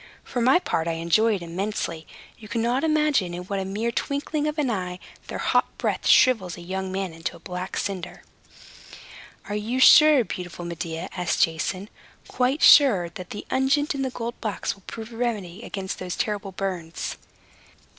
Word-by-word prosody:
For 245 - -3
my 255 +7 +5
part, 165 - -1
I 165 - 0
enjoy 170 +7 +2
it 185 - -6
immensely. 170 -2 -4 0.3
You 215 - -13
cannot 235 +5 0
imagine 300 - +2
in 180 - -6
what 195 +2 -3
a 190 - -3
mere 215 +5 -2
twinkling 290 +4 -2
of 300 +1 -3
an 280 -5 +1
eye 180 -4 -3 0.3
their - - -5
hot - - +1
breath - - -1
shrivels 195 -10 +4
a - - -9
young 190 +2 -4
man 190 -2 -3
into 165 +1 -5
a - - -13
black 180 +1 -5
cinder." 185 -3 -4 1.2
"Are 205 - -4
you 220 +5 -2
sure, 300 0 +8
beautiful 180 -4 -6
Medea," 170 0 -4
asked 180 -2 +1
Jason, 165 +4 -1 0.4
"quite 260 +4 0
sure, 210 - +7
that 180 +1 -9
the 205 - -7
unguent 280 +3 +2
in 275 - -3
the 265 - 0
gold 235 -1 -6
box 215 -3 -2
will 195 - -20
prove 225 +1 -8
a - - -9
remedy 215 -6 -2
against 195 -4 -5
those 180 -1 -4
terrible 205 -2 -2
burns?" 185 -4 -4
200 Hz, 175 wpm, -25 LUFS, 180-245 Hz, 1.2 s, sure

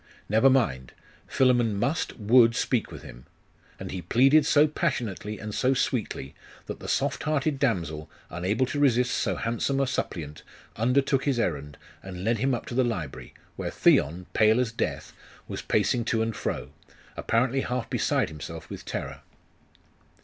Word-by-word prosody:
Never 110 +6 +4
mind. 85 - +1 0.3
Philammon 120 -5 +2
must, 140 +10 -1
would 115 +1 +5
speak 125 -1 0
with - - -9
him. - - -12 0.5
And - - -6
he 95 - -4
pleaded 135 - +4
so 150 0 +5
passionately 120 - -2
and 110 -1 -7
so 130 +4 +2
sweetly, 110 - -2 0.3
that - - -7
the - - -8
soft 140 0 0
hearted 155 -2 0
damsel, 85 - -1 0.2
unable 95 +9 0
to 145 - -3
resist 125 -3 +3
so - - 0
handsome 120 +4 -1
a 135 - +2
suppliant, 80 - -4 0.3
undertook 130 +4 +1
his 135 -4 +1
errand, 75 -8 -2 0.2
and 90 -1 -8
led 115 +1 +1
him 130 +2 +1
up - - -6
to 140 - -7
the 130 +1 +3
library, 90 - -4 0.2
where - - -3
Theon, 85 +6 +2
pale 110 +2 +4
as 125 -2 0
death, 115 - -3 0.3
was - - -5
pacing 120 - +1
to 115 -1 +1
and 115 -1 -3
fro, - - -4 0.4
apparently 125 +3 +1
half 125 -2 -3
beside - - 0
himself 75 -3 -9
with - - -7
terror. - - -5
115 Hz, 160 wpm, -26 LUFS, 95-135 Hz, 0.5 s, would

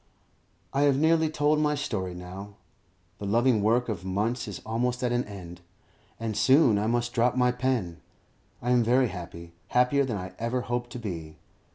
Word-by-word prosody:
I 140 - +1
have 135 - +2
nearly 160 +1 +3
told 150 0 +2
my 150 -1 +2
story 95 -10 -3
now; 95 +3 -9 0.6
the 100 - -4
loving 115 +1 +3
work 115 +4 +2
of 105 -6 -4
months 105 +6 -1
is - - -6
almost 125 +3 -1
at 125 - +1
an 120 0 0
end, 90 -4 -10 0.6
and 110 -1 -3
soon 120 0 +5
I 105 - 0
must 120 +1 0
drop 120 +1 +2
my 125 0 +4
pen. 120 -10 -2 0.6
I 125 - 0
am 125 -1 +4
very 125 +2 +3
happy, 85 -2 -9
happier 125 +3 +3
than 120 -6 -2
I 90 -1 -7
ever 115 +2 -1
hoped 120 0 -3
to - - -5
be. 85 -9 -6
120 Hz, 180 wpm, -27 LUFS, 100-125 Hz, 0.6 s, soon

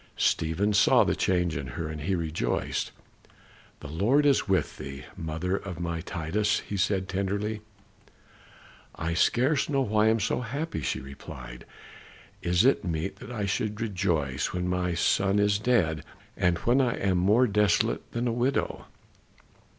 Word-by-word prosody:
Stephen 90 +6 +1
saw 110 +1 +5
the - - 0
change 90 -3 +1
in 70 -1 -4
her 80 - -2
and 80 -1 -6
he 95 +6 0
rejoiced. 80 -2 -2 0.9
"The 75 - -7
Lord 105 - +2
is 140 -5 +3
with 95 - +1
thee, 70 -1 -7
mother 80 +4 -2
of 95 -4 -6
my 85 -1 -3
Titus," 100 +7 -1
he 105 - -6
said, 95 -1 0
tenderly. 100 +3 -2 1.3
"I 85 +1 -2
scarce 130 - +2
know 140 -2 +2
why 110 -3 +2
I - - +5
am 115 +1 +2
so 105 - 0
happy," 140 +8 -4
she - - -1
replied. 65 -2 -10 0.7
"Is 90 +5 +2
it 135 - +4
meet 90 +3 -3
that 105 - -10
I 110 -4 -2
should 105 +2 -2
rejoice 90 - -1
when 90 0 -2
my 90 -1 0
son 95 +4 +2
is 100 0 +3
dead, 85 -11 +1 0.3
and 90 -1 +2
when 125 +8 +2
I 125 -3 +1
am 95 -2 +1
more 105 +8 +4
desolate 105 -4 +1
than 120 +1 -1
a - - +1
widow?" 125 +3 -1
95 Hz, 160 wpm, -27 LUFS, 85-110 Hz, 1.3 s, saw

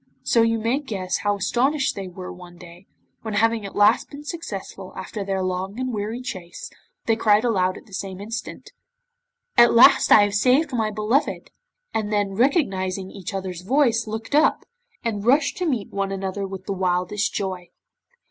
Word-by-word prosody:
So 230 - +3
you 230 0 +2
may 230 +5 0
guess 195 -10 -3
how 205 -1 0
astonished 265 - +1
they 195 -1 -5
were 180 0 -8
one 180 -1 -13
day, 175 +2 -14 0.3
when 220 -2 -4
having 225 -1 +1
at - - -12
last 205 +2 +4
been 285 0 -10
successful 205 - -7
after 210 - -5
their 195 -1 -2
long 185 +4 -3
and 255 -1 -2
weary 215 +3 -3
chase, 180 -8 -7 0.3
they 225 - +3
cried 215 -1 +3
aloud 185 -6 +1
at - - -14
the 205 - -19
same 190 -1 -5
instant: 220 +3 -7 0.9
'At 240 0 +7
last 270 +4 +7
I 210 - +9
have 205 0 0
saved 255 +8 +3
my 220 -3 0
beloved,' 215 +7 -1 0.4
and 215 -1 -2
then 205 -2 +1
recognising 195 - 0
each 200 +2 -7
other's 190 -3 -5
voice 235 +1 +2
looked 220 +4 -6
up, 300 +2 +3 0.4
and 215 -4 -2
rushed 280 +5 +3
to 360 - -1
meet 235 -8 -2
one 195 -1 -2
another 195 0 -3
with 195 -1 -8
the 200 - -2
wildest 185 +2 0
joy. 185 -3 -4
205 Hz, 175 wpm, -23 LUFS, 190-235 Hz, 0.9 s, I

